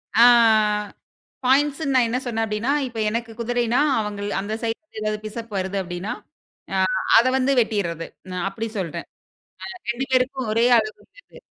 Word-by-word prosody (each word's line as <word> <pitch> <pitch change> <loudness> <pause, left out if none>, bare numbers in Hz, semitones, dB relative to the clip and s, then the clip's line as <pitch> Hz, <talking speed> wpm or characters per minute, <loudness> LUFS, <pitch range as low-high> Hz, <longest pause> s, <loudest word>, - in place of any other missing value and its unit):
ஆ, - - +3 1.3
பாயிண்ட்ஸ்ன்னு 275 +2 +2
நான் 245 -2 +4
என்ன 250 +2 0
சொன்னன் 225 -2 -1
அப்டின்னா, 220 +6 -1
இப்ப 230 -2 -7
எனக்குக் 230 0 -4
குதிரைன்னா 240 +1 0 0.2
அவங்கள் 205 -1 -3
அந்தச் 215 +4 -4
சைடுல 230 +2 -5
எதாவது 215 0 -1
பிஷப் 225 0 -7
வருது 190 +1 -2
அப்டின்னா, 175 +3 -4 0.6
அ - - +1 0.4
அத 235 +3 +5
வந்து 265 +1 +2
வெட்டிர்றது. 170 -7 -2 0.2
நான் 180 0 -3
அப்படி 225 +3 -4
சொல்றன். 170 -6 -4 0.6
அ - - -7 0.2
2 260 +3 -3
பேருக்கும் 260 -2 +1
ஒரே 230 +2 +3
அளவு 215 -1 -1
இருக்கறது. - - -18
225 Hz, 150 wpm, -23 LUFS, 210-250 Hz, 1.3 s, அத